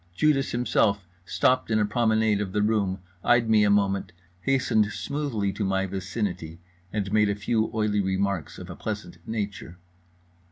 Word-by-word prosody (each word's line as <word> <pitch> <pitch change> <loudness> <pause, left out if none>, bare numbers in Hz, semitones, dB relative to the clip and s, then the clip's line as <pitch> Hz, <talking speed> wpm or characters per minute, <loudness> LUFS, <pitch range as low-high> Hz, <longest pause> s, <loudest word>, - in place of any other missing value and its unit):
Judas 145 0 +2
himself 105 -5 +1 0.2
stopped 130 +4 +1
in 110 - +2
a 105 - +3
promenade 110 -1 +2
of 95 -2 -4
the 105 0 +1
room, 100 -3 0 0.2
eyed 120 -1 +4
me 110 -1 +5
a 105 - +3
moment, 100 -2 +1 0.3
hastened 125 -2 +2
smoothly 120 -11 -2
to 105 - -3
my 95 0 +1
vicinity, 95 -3 -4 0.3
and 100 -1 -2
made 105 -1 +4
a 100 - 0
few 110 +3 0
oily 105 -2 +1
remarks 95 -3 -1
of - - -8
a - - -7
pleasant 105 -5 -6
nature. 100 -5 -4
105 Hz, 160 wpm, -26 LUFS, 95-110 Hz, 0.3 s, me